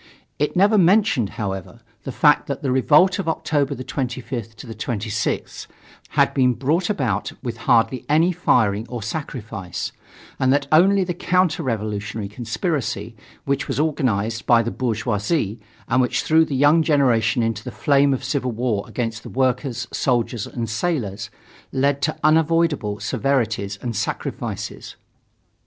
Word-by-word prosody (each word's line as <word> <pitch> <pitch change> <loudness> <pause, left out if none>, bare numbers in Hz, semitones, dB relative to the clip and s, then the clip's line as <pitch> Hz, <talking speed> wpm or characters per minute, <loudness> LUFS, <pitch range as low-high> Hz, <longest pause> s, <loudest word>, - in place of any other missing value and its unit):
It 150 - 0
never 205 +3 +4
mentioned, 185 - +3
however, 100 +2 -5 0.2
the 135 - -3
fact 150 +3 +3
that 140 0 -4
the 135 - 0
revolt 155 +9 +4
of 195 - -3
October 145 -3 0
25th 125 -3 -4
26th 110 -2 -4 0.5
had - - +4
been 125 -2 +3
brought 160 - 0
about 125 - -1
with 120 -3 -4
hardly 120 +2 +3
any 160 +4 +4
firing 115 - +1
or 120 -3 -5
sacrifice, 115 - -5 0.5
and 130 0 +3
that 140 +1 +2
only 190 +5 +5
the 180 -1 -3
counter 180 -1 +1
revolutionary 105 -2 -3
conspiracy 125 - -3 0.3
which 140 +1 -1
was 135 -2 -2
organized 115 -8 0
by 120 -1 +5
the 120 - -3
bourgeoisie 110 - -1 0.3
and 130 +2 +3
which 125 - 0
threw 160 +1 +4
the 145 - -4
young 145 +5 +5
generation 130 -7 +2
into 115 -1 -2
the - - -6
flame 140 -1 +3
of 135 0 -1
civil 130 -1 -1
war 115 -3 -1
against 115 -2 -3
the - - -10
workers, 125 -1 -1
soldiers 120 -3 0
and 115 -2 -4
sailors, 110 - -2 0.4
led 140 +1 +1
to 155 - -1
unavoidable 155 -8 +2
severities 110 -3 -1
and 120 -2 -3
sacrifices. - - -4
130 Hz, 140 wpm, -22 LUFS, 115-150 Hz, 0.5 s, only